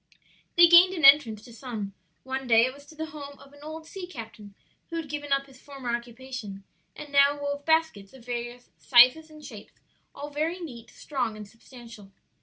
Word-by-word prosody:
They 345 - +9
gained 350 +2 +7
an 320 -5 +1
entrance 260 -7 +6
to 240 - -14
some; 220 -5 -6 0.3
one 265 0 -5
day 230 0 +5
it 255 - -4
was 285 +1 -16
to 315 - -15
the 315 0 -6
home 285 -2 -10
of 275 0 -18
an 285 - -17
old 315 +1 -9
sea 360 +2 -8
captain 220 - -11 0.3
who 335 - -6
had 330 -2 -4
given 290 0 -6
up 275 0 +1
his 265 -2 -19
former 265 -4 -4
occupation 235 -4 -8 0.3
and 295 -1 -10
now 280 +1 +4
wove 285 0 -4
baskets 320 -12 0
of 260 -3 -16
various 245 0 -6
sizes 255 +6 +5
and 305 -1 -14
shapes, - - -12 0.4
all 290 +1 -8
very 315 +5 -2
neat, 240 -9 -10
strong 245 -7 -4
and 210 -1 -9
substantial. 230 -3 -15
275 Hz, 195 wpm, -26 LUFS, 235-300 Hz, 0.4 s, They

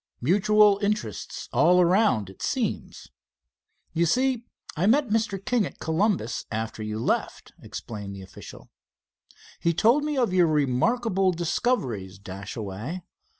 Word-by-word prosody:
"Mutual 205 - +4
interests 210 +1 -3
all 180 +1 +5
around, 180 - +3
it 95 - -17
seems. - - -3 0.8
You 170 +1 +2
see, 255 +4 +1 0.3
I 170 +5 +1
met 265 +2 +3
Mr. 220 -2 0
King 225 +4 0
at - - -13
Columbus 160 - -1
after 110 0 -4
you 110 0 -4
left," 110 - -2
explained 100 -3 -7
the 95 - -9
official. 95 - -12 0.9
"He 170 -1 +1
told 235 - +4
me 300 -1 -2
of 240 -7 +1
your 180 -2 +5
remarkable 185 - +1
discoveries, 150 - -1
Dashaway. 100 - -6
175 Hz, 125 wpm, -26 LUFS, -, 0.9 s, all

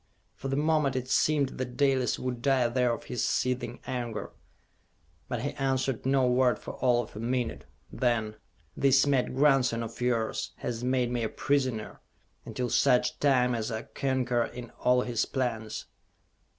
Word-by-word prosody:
For - - -7
the 135 - -1
moment 150 -2 +2
it 130 -1 -2
seemed 145 +1 +2
that 125 -1 -4
Dalis 135 -3 +2
would 125 -2 -4
die 130 -2 +3
there 125 0 +2
of 115 - -4
his 125 - -3
seething 125 0 -1
anger; 120 -4 -4 1.0
but - - -3
he - - -1
answered 130 -2 -1
no 135 -1 +3
word 125 -2 +3
for - - -8
all 125 -2 +2
of - - -14
a - - -6
minute. 120 +1 -2 0.3
Then: 110 -4 0 0.4
"This 135 0 +4
mad 135 -3 +1
grandson 135 -4 +3
of 115 +2 -8
yours 115 -3 -1
has 120 -1 -4
made 125 -1 +1
me 120 -1 -1
a 110 - -1
prisoner, 130 -6 -1 0.4
until 125 -2 -3
such 125 - +3
time 125 -3 +3
as 115 0 -2
I 110 0 -3
concur 125 -3 0
in 120 -1 -9
all 125 0 +3
his 120 -3 -1
plans!" 115 -5 -3
125 Hz, 165 wpm, -28 LUFS, 120-135 Hz, 1.0 s, This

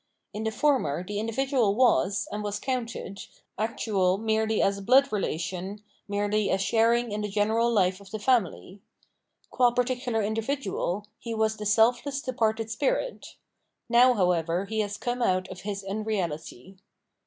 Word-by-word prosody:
In 215 +1 -4
the 220 - 0
former 220 - +1
the 205 +2 -4
individual 230 -1 +1
was, 210 -5 +2
and 210 - -3
was 205 0 -2
counted, 235 -6 -4 0.4
actual 200 -4 +1
merely 220 0 0
as 195 0 +2
a - - -8
blood 265 +7 +4
relation, 190 +1 -3 0.2
merely 205 +1 0
as 190 - +1
sharing 230 +3 +2
in 210 +1 -2
the 210 - -3
general 220 +3 +1
fife 185 -1 +2
of 200 - -14
the 215 - -4
family. 205 -4 0 0.7
Qua 245 -1 +4
particular 245 -2 -1
individual, 220 -3 -2
he 230 -1 -5
was 220 0 +1
the 210 - -3
selfless 240 +6 +2
departed 225 -4 -1
spirit; 285 - -2 0.5
now, 245 +1 +6
however, 180 -2 +1
he 220 +2 -3
has 205 -1 -2
come 245 0 -3
out 185 -4 +1
of 185 -1 -9
his 200 0 -4
unreality. 195 - -4
215 Hz, 150 wpm, -27 LUFS, 195-235 Hz, 0.7 s, now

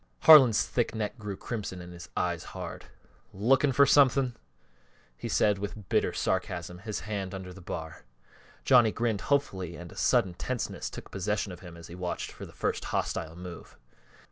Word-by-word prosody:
Harlan's 135 -9 +8
thick 120 -2 -1
neck 110 +2 -3
grew 105 -3 -5
crimson 105 -6 -5
and 90 0 -9
his 85 +1 -10
eyes 85 -2 0
hard. - - -6 0.5
"Lookin' 135 +8 +3
fer 140 +2 +6
something?" 135 -2 +4 0.8
he - - -6
asked 105 -2 +2
with 100 0 -6
bitter - - +2
sarcasm, 90 -2 -2
his 105 +2 -4
hands 100 -3 -4
under 95 -1 -7
the 95 - -12
bar. 80 -2 -6 0.6
Johnny 120 -4 +6
grinned 115 -3 -1
hopefully 95 - 0
and 85 0 -9
a - - -13
sudden 115 -8 +2
tenseness 125 +7 -3
took - - -10
possession 100 +1 -1
of 90 - -9
him 90 -2 -11
as 85 - -11
he 85 - -11
watched 90 0 -4
for - - -9
the - - -13
first - - -2
hostile 80 0 -2
move. 90 0 -10
100 Hz, 170 wpm, -29 LUFS, 90-120 Hz, 0.8 s, Harlan's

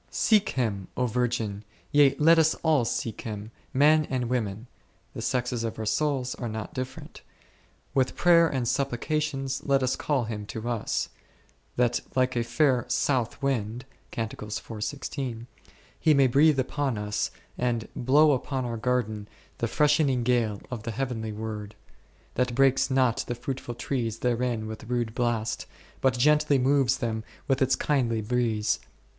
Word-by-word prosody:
Seek 215 -2 +3
Him, 100 -7 -1
O 125 - +2
virgin, 115 -4 -1 0.3
yea 145 -2 +5
let 165 +2 +6
us 160 0 +4
all 155 -7 +3
seek 115 -1 -3
Him, 110 0 -6 0.2
men 150 +3 +4
and 125 -3 -1
women 110 -3 -2 0.5
(the - - -6
sexes 125 -2 -1
of 115 - -3
our 110 - -4
souls 135 +1 0
are 120 - -5
not 110 0 -5
different), 130 0 -7 0.7
with 130 -2 +1
prayer 170 -1 +5
and 130 -5 -1
supplications 135 +1 -1
let 135 -1 +2
us 130 - +1
call 140 -5 0
Him 105 -2 -5
to 110 +2 -5
us, 120 -3 -1 0.7
that 120 -1 +2 0.2
like 130 -1 +2
a 120 - +1
fair 130 0 +2
south 125 -1 0
wind 120 -2 -1 0.3
1 110 -2 -1 1.7
He 155 - +4
may 140 -1 +5
breathe 140 +3 +4
upon 135 -2 -1
us 105 0 -1 0.3
and 120 -2 -1
blow 145 +5 +4
upon 130 -1 -1
our 115 -1 -3
garden 110 -3 -1 0.3
the 115 - 0
freshening 145 -2 +2
gale 115 -4 +1
of 120 -3 -4
the 115 - -5
heavenly 115 -2 -3
Word, 105 -1 -6 0.6
that 125 -1 0
breaks 135 0 +3
not 130 -3 +2
the 120 - -2
fruitful 125 0 -5
trees 115 -3 -2
therein 120 -2 0
with 110 0 -7
rude 120 -3 -1
blast, 120 -2 -1 0.3
but 130 -2 +2
gently 150 +2 +4
moves 135 -1 +3
them 110 -3 -2 0.2
with 135 0 +1
its 130 0 +4
kindly 120 -7 0
breeze. 115 -2 0
125 Hz, 150 wpm, -27 LUFS, 115-135 Hz, 1.7 s, let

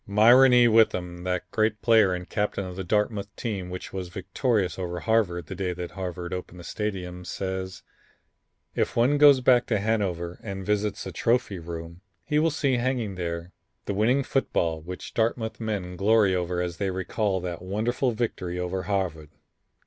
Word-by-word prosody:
Myron 120 +6 +7
E. 120 -1 +6
Witham, 90 -6 +2
that 90 -1 -1
great 110 -1 +1
player 110 -5 +5
and 90 0 -4
captain 105 -1 -1
of 90 -1 -7
the 95 - -4
Dartmouth 105 +1 0
team 100 -6 -4
which 90 0 -7
was 95 -2 -4
victorious 95 - -1
over 90 -1 -4
Harvard 100 -7 +1
the - - -7
day 95 -2 -2
that 90 0 -6
Harvard 90 -2 -5
opened 90 -1 -6
the - - -9
Stadium, 90 -3 -4
says: 95 0 -4 0.9
"If - - -1
one 130 +5 +3
goes 145 -3 +7
back 125 -1 +4
to 110 - +1
Hanover 95 -5 -1
and 95 -3 -6
visits 105 0 -1
the 95 - -6
trophy 115 +1 0
room 85 +1 -8 0.2
he 150 -1 +1
will 165 +1 +3
see 140 -4 +1
hanging 120 -4 -1
there 85 -1 -4 0.3
the - - -2
winning 120 +7 +2
football 85 - 0
which 90 +3 -8
Dartmouth 110 0 -1
men 100 -5 -3
glory 105 0 +4
over 90 -1 -1
as 85 -1 -4
they 100 -1 -1
recall 95 +2 -1
that 85 -2 -5
wonderful 110 +7 0
victory 110 -6 -3
over 90 +1 -2
Harvard. 90 -7 -2
95 Hz, 170 wpm, -26 LUFS, 90-110 Hz, 0.9 s, Myron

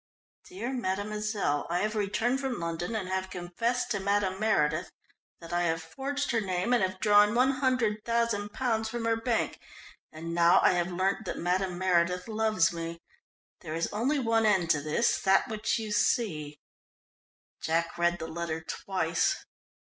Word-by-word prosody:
"Dear 315 -9 -5
Mademoiselle, 210 - -1
"_I 175 +1 0
have 215 +1 0
returned 225 +5 0
from 265 -3 -3
London 170 +5 -3
and 200 -4 -2
have 190 0 -2
confessed 230 +9 -2
to 205 - 0
Madame 195 -1 0
Meredith 170 -6 +1 0.5
that 165 0 -9
I 175 - +2
have 165 -1 -1
forged 285 +1 -3
her 230 -2 +1
name 185 +4 -1
and 245 - +3
have 185 0 -1
drawn 210 +1 +5
£100,000 235 -3 +1
from 235 0 -4
her 230 0 +2
bank. 225 0 -1 0.5
And 165 +2 -6
now 170 +1 +5
I - - +6
have 175 0 0
learnt 190 +4 0
that - - -4
Madame 180 +1 -1
Meredith 180 0 +1
loves 215 -6 +2
me. 165 0 -5 0.6
There 155 -2 -6
is 165 - -1
only 250 +8 +1
one 225 -4 +2
end 185 -5 +3
to 145 - +2
this 155 +10 +1
that 195 +3 +3
which 215 -1 -1
you 220 -2 -4
see 155 -9 0 1.0
_" - - -23
Jack 165 +1 0
read 175 0 +1
the 160 - -6
letter 165 -1 -3
twice. 170 +1 -1
195 Hz, 160 wpm, -29 LUFS, 175-225 Hz, 1.0 s, I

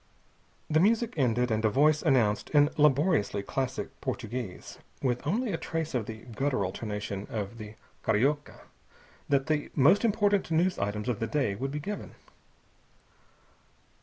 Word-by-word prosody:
The 155 - +2
music 225 +5 +2
ended, 125 -4 +1
and 110 0 0
a 110 - +4
voice 150 +6 +3
announced 120 -9 +2
in 145 +1 +5
laboriously 145 - +2
classic 130 +4 -3
Portuguese, 120 -7 -5 0.2
with 125 +1 -1
only 220 +7 0
a - - 0
trace 165 -1 -3
of 120 -5 -1
the 110 0 -8
guttural 125 -8 0
tonation 105 -2 -5
of 110 +1 -5
the 105 0 -9 0.3
carioca, 145 +7 0 0.7
that 140 -1 +2
the 150 -2 -1
most 155 - +5
important 205 -4 +2
news 175 +3 +1
items 105 +2 -2
of 120 -4 -1
the 115 - -1
day 115 -3 0
would 130 +8 -3
be 150 +2 -4
given. 205 +8 -6
135 Hz, 145 wpm, -29 LUFS, 110-155 Hz, 0.7 s, in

